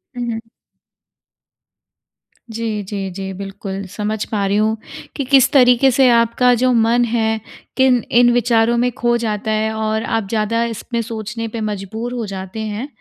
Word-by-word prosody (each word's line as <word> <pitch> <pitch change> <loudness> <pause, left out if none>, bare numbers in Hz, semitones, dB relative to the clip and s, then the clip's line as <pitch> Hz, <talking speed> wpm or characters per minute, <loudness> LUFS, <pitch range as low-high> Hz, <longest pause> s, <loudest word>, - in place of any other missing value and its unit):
हुँ, 245 -1 -3
हुँ। 225 0 -4 2.1
जी, 225 -1 -3
जी, 195 0 -4
जी, 190 +1 -6
बिल्कुल। 195 0 -6
समझ 210 +2 -3
पा 205 -3 -1
रही 200 +1 +1
हूँ 220 +1 +1 0.4
कि, 280 - -2
किस 265 0 +4
तरीके 255 -1 +5
से 260 +1 +4
आपका 235 +1 +3
जो 255 0 +3
मन 235 +1 +3
है, 220 -1 0 0.4
किन 260 -2 +4
इन 240 +1 +5
विचारों 235 -1 +2
में 245 +1 +1
खो 240 0 0
जाता 220 -2 -2
है 215 0 0
और 220 0 -1
आप 225 -3 -1
ज़्यादा 225 +1 0
इसमें 235 +1 -3
सोचने 225 0 -5
पे 225 0 -5
मजबूर 215 +3 -4
हो 240 -2 -3
जाते 190 +1 -6
हैं। 220 +4 -4
225 Hz, 160 wpm, -18 LUFS, 210-240 Hz, 2.1 s, तरीके